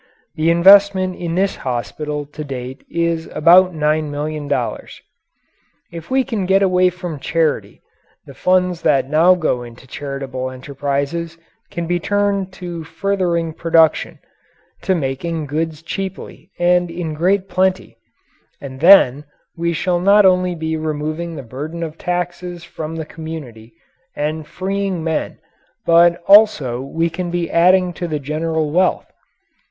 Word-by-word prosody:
The 155 +1 0
investment 190 +1 +5
in 170 -1 -4
this 195 +2 0
hospital 145 +4 -4
to 150 +1 -8
date 130 -1 -7
is 170 -1 -1
about 180 +4 +5
$9,000,000. 150 -1 -2 0.9
If 165 -1 -9
we 265 0 +2
can 220 -8 -3
get 195 +1 +3
away 185 -1 +3
from 180 -4 -7
charity, 160 +1 -1 0.4
the - - -12
funds 180 -1 +1
that 135 -3 +2
now 165 +5 +4
go 155 -8 -1
into 120 +1 -12
charitable 135 -1 -5
enterprises 140 +5 -4 0.3
can 170 - -4
be 175 +1 0
turned 200 0 0
to 175 -3 -7
furthering 170 -1 -1
production 165 -1 +2 0.6
to 190 - +1
making 155 +2 -3
goods 155 +2 -3
cheaply 190 +2 -6
and 175 0 +2
in 165 -2 -4
great 185 +5 +1
plenty. 185 0 0 0.6
And 130 -2 -9
then 150 -5 +6 0.3
we 170 0 -1
shall 175 +1 0
not 200 +3 +5
only 180 -1 +3
be 160 -1 -3
removing 155 +2 -4
the 140 - -7
burden 150 +8 -6
of 160 -1 -7
taxes 175 0 -4
from 160 -1 -7
the 160 -1 -5
community 150 -8 -9 0.4
and 155 +1 -3
freeing 190 +1 -3
men 160 -1 -2 0.5
but 170 +1 +4
also 195 - +5
we 165 +5 -1
can 175 +1 -4
be 175 -1 -2
adding 180 +1 +4
to 175 +1 -5
the 155 -2 -2
general 155 +2 -2
wealth. 180 +3 +1
165 Hz, 135 wpm, -18 LUFS, 150-180 Hz, 0.9 s, then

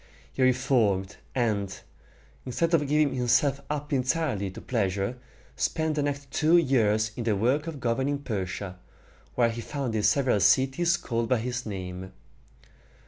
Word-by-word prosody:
He - - -3
reformed, 115 -7 +2 0.2
and, 105 -6 -1 0.6
instead 165 +7 -1
of 150 -4 +3
giving 150 0 +2
himself 130 +2 +2
up 150 0 -3
entirely 130 -6 0
to 95 - -9
pleasure, 100 +1 -1 0.4
spent 160 -1 0
the 150 - 0
next 140 -1 -3
two 160 +3 +4
years 110 -8 +2
in 120 - -4
the 110 -2 +1
work 130 +10 +1
of 155 -4 -5
governing 130 +4 0
Persia, 95 -7 -4 0.6
where 120 -2 +3
he 115 +1 -5
founded 120 -6 -3
several 120 +1 +3
cities 135 - +3
called 115 -1 -2
by 125 - +3
his 120 +1 -3
name. 95 -2 -6
125 Hz, 140 wpm, -27 LUFS, 105-140 Hz, 0.6 s, two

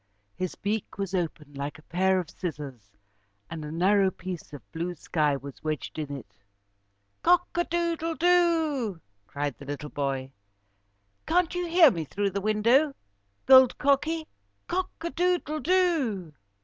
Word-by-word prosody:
His 185 -1 -3
beak 210 +1 -3
was 195 -2 -3
open 160 -5 -3
like 140 +1 -5
a 150 - -17
pair 190 +3 +2
of 175 - -4
scissors 135 - -7 0.5
and 160 -2 -5
a 150 - -6
narrow 190 +4 +3
piece 180 -2 -7
of 145 -6 -9
blue 175 +2 -3
sky 150 -2 0
was 140 0 -11
wedged 155 0 -3
in 150 -2 -4
it. 120 - -14 0.8
"Cock 355 +1 +4
a 345 - +1
doodle 335 -1 -1
do," 320 - +2 0.3
cried 145 -4 -3
the 140 - -10
little 145 +1 -6
boy. 135 -2 -2 1.0
"Can't 355 +1 +2
you 355 -1 -2
hear 335 -4 +7
me 165 -5 -3
through 200 +6 -1
the 200 +1 -2
window, 230 +8 +3 0.5
Gold 260 -2 +7
Cocky? 300 +3 +1 0.4
Cock 370 +1 -1
a 340 +1 -3
doodle 350 -3 0
do! 300 - +1
195 Hz, 150 wpm, -27 LUFS, -, 1.0 s, hear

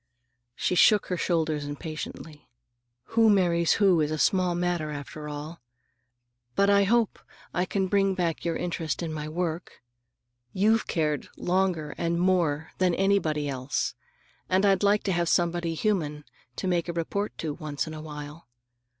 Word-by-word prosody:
She - - 0
shook 205 +3 +5
her 180 - 0
shoulders 160 -4 0
impatiently. 150 +1 -7 0.6
"Who 225 -1 +5
marries 175 -4 +3
who 190 -5 +4
is 150 - +1
a 155 - -2
small 180 +2 +2
matter, 175 -3 -1
after 150 +1 -7
all. 150 +2 -7 0.9
But 200 0 +4
I 200 0 +5
hope 230 +1 +2 0.3
I 180 - +1
can 195 0 0
bring 195 0 +2
back 170 -3 -1
your 170 -1 -1
interest 170 -1 -3
in 160 -2 -3
my 155 0 -4
work. 165 -2 -4 0.7
You've 215 +4 +2
cared 150 -4 -1
longer 175 -5 0
and 170 0 0
more 170 -4 +1
than 180 -2 +3
anybody 175 -7 +1
else, 130 0 -2 0.6
and 190 +2 +3
I'd 195 -1 +3
like 205 +1 +3
to 195 - 0
have 170 -1 +1
somebody 170 -1 +1
human 155 -7 -1 0.3
to 190 - -3
make 175 -1 0
a - - -2
report 200 +5 -3
to 155 -2 -3
once 150 -3 -4
in 160 - -7
a 155 - -7
while. 150 +1 -9
170 Hz, 160 wpm, -27 LUFS, 155-190 Hz, 0.9 s, shook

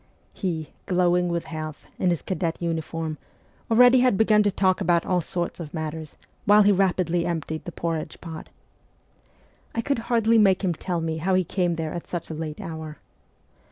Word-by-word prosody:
He, 165 -6 -3 0.2
glowing 180 -1 +2
with 170 -1 -2
health, 155 -1 -6
in 185 - +2
his 170 -3 -1
cadet 175 -3 -2
uniform, 165 -2 -3 0.5
already 245 +2 +7
had 250 -5 +3
begun 215 0 +5
to 205 - +3
talk 190 -1 +1
about 170 0 +2
all 180 -1 +1
sorts 175 +2 -3
of 160 -1 -7
matters, 155 -1 -5 0.3
while 210 +1 +7
he 205 - +5
rapidly 180 -3 +2
emptied 160 -2 -3
the 175 - -5
porridge 165 -2 -4
pot. 165 -2 -8 1.3
I 230 - +1
could 280 +1 -1
hardly 230 -1 +4
make 195 -2 +4
him 180 -2 +1
tell 175 +1 -3
me 160 -1 -2
how 185 +4 +1
he 185 - +3
came 175 0 0
there 160 -1 -3
at 175 - -6
such 170 -2 -5
a - - -3
late 155 -1 -5
hour. 160 -2 -7
175 Hz, 180 wpm, -25 LUFS, 160-190 Hz, 1.3 s, already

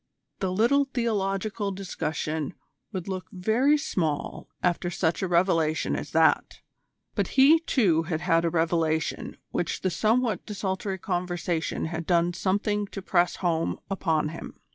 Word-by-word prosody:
The 190 -2 -1
little 240 +9 +3
theological 210 -4 -1
discussion 160 -5 -3 0.4
would 185 -3 -5
look 185 -3 -4
very 225 +11 +3
small 160 - -2
after 175 0 +1
such 170 0 0
a 190 - 0
revelation 170 -3 +2
as - - -4
that. - - +2 0.5
But - - 0
he, 290 +5 +7
too, 205 - +2
had 160 0 -3
had 165 -1 +2
a 170 - +2
revelation 160 -1 0
which 175 - -2
the 185 - 0
somewhat 220 +4 +1
desultory 190 -1 -3
conversation 175 -3 -2
had 160 0 -4
done 175 -1 +3
something 205 +3 0
to 195 - -7
press 175 -2 +2
home 165 -1 0
upon 160 -5 +1
him. 165 - -9
185 Hz, 140 wpm, -27 LUFS, 165-205 Hz, 0.5 s, he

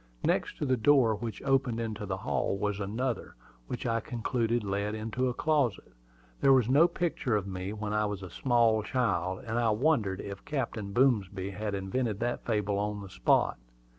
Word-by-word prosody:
Next - - 0
to - - -2
the 130 -2 +2
door 125 -2 +5
which 110 +2 -5
opened 135 -4 +1
into 110 -2 -4
the 95 -1 -2
hall 100 0 -1
was 105 0 -1
another, 115 +3 -3 0.3
which - - -5
I 115 -1 +1
concluded 115 +1 -1
led 100 +1 -2
into 115 +4 -1
a - - -2
closet. 140 - 0 0.5
There 135 - +5
was 125 -4 +4
no 145 +7 +6
picture 160 -10 -1
of 100 -3 0
me 95 0 -4
when 105 -1 -4
I 105 0 +2
was 100 -2 -5
a 90 - -8
small 115 -1 +3
child; 95 -6 -1
and 115 +1 -1
I 115 -1 +2
wondered 110 -5 +1
if 100 -1 -7
Captain 115 -8 -3
Boomsby 100 -6 +1
had 105 +1 -3
invented 100 +2 -2
that 120 0 -1
fable 105 -3 0
on 105 0 -2
the 100 - -9
spot. - - +2
110 Hz, 185 wpm, -30 LUFS, 100-125 Hz, 0.5 s, no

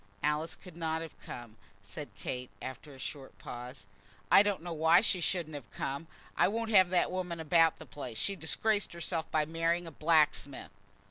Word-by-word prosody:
"Alice 150 +2 0
could 180 -4 -13
not 160 -1 -1
have 160 - -9
come," 120 -2 -9 0.3
said 100 +9 -7
Kate, 125 0 -4
after 130 +3 -7
a 135 - -12
short 135 +1 -7
pause. 120 -4 -8 0.5
"I - - +10
don't 205 -4 0
know 175 -1 -4
why 160 +2 +5
she 195 -5 +1
shouldn't 170 -2 0
have 145 -5 -8
come. 140 +4 -4 0.3
I - - +5
won't 225 +3 -2
have 190 -4 +7
that 180 -1 +2
woman 180 -2 -3
about 165 0 +4
the - - -10
place. 125 -6 -7
She 195 - 0
disgraced 200 +5 +1
herself 165 -1 -3
by 155 -1 +2
marrying 165 +2 0
a 165 - -7
blacksmith 150 -5 +2
160 Hz, 185 wpm, -32 LUFS, 145-175 Hz, 0.5 s, I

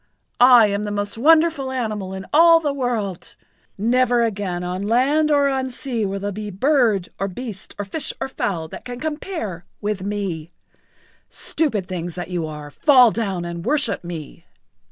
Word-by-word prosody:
I 245 -2 +8
am 200 0 -1
the 210 - -3
most 205 0 -2
wonderful 310 +1 +3
animal 215 -7 -3
in 190 0 -7
all 330 +2 +7
the 295 -3 -1
world. 230 -9 -3 0.4
Never 240 +3 +2
again 195 -5 -2
on 180 +1 -3
land 265 +9 +2
or 285 -1 +4
on 265 -1 -1
sea 240 -4 -2
will 195 +1 -3
there 205 +1 -3
be 210 +1 -6
bird 220 - +2
or 195 - 0
beast 205 0 -8
or 205 - -3
fish 275 +9 -1
or - - -2
fowl 175 -10 -3
that - - -9
can 245 -1 -7
compare[Pg 310 +1 -3
78] 215 - -5 0.2
with 205 -2 -2
me. 190 -5 -3 0.8
Stupid 265 - -1
things 175 -2 -5
that 175 0 -5
you 170 -3 -2
are, 150 -1 -8
fall 255 - +5
down 195 -6 -2
and 170 0 -6
worship 290 -7 0
me." 165 -4 -8
215 Hz, 175 wpm, -21 LUFS, 190-260 Hz, 0.8 s, I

